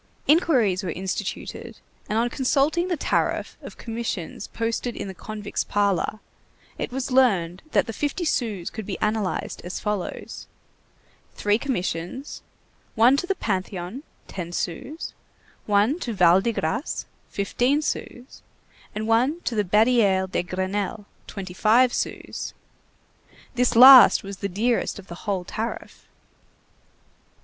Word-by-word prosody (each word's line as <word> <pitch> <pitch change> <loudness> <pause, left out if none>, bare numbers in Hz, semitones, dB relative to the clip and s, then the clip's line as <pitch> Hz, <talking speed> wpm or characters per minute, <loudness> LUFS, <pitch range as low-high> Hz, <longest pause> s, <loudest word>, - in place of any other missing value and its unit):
Inquiries 260 - +3
were 185 - -3
instituted, 185 +3 -5 0.3
and 215 - 0
on 235 +1 +1
consulting 290 +6 +1
the 350 -3 -1
tariff - - -1
of - - -10
commissions 225 -6 -5
posted 230 +1 -3
in - - -5
the 190 - -6
convict's 210 +2 -4
parlor, 205 +1 0 0.6
it - - -3
was 265 +1 -3
learned 195 -10 +2
that - - +3
the 225 - -6
fifty 295 - -2
sous 215 - -1
could 220 -3 -7
be 195 - -3
analyzed 210 -2 -2
as 180 +1 -5
follows: 210 -4 -4 0.9
three 205 +1 +1
commissions; 235 - -4 0.5
one 235 +4 +6
to 330 +5 -2
the 390 - 0
Panthéon, 190 - -3 0.3
ten 175 -3 -6
sous; 220 - -4 0.5
one 210 - +3
to 240 -9 -3
Val 180 -1 +5
de 235 +3 0
Grâce, 185 - -2 0.2
fifteen 245 +8 +1
sous; 255 -4 -5 0.5
and 215 +1 -3
one 250 +9 +2
to 245 - -3
the 210 -2 +1
Barrière 210 -1 +3
de - - +1
Grenelle, 190 +4 -3 0.2
twenty 190 -3 -7
five 235 +6 +4
sous. - - -4 1.0
This 250 -1 +1
last 255 -1 +10
was 195 0 -7
the 200 - -3
dearest 225 +7 0
of 200 - -10
the 170 +3 -10
whole 190 -3 0
tariff. 225 +5 -6
215 Hz, 135 wpm, -24 LUFS, 190-250 Hz, 1.0 s, last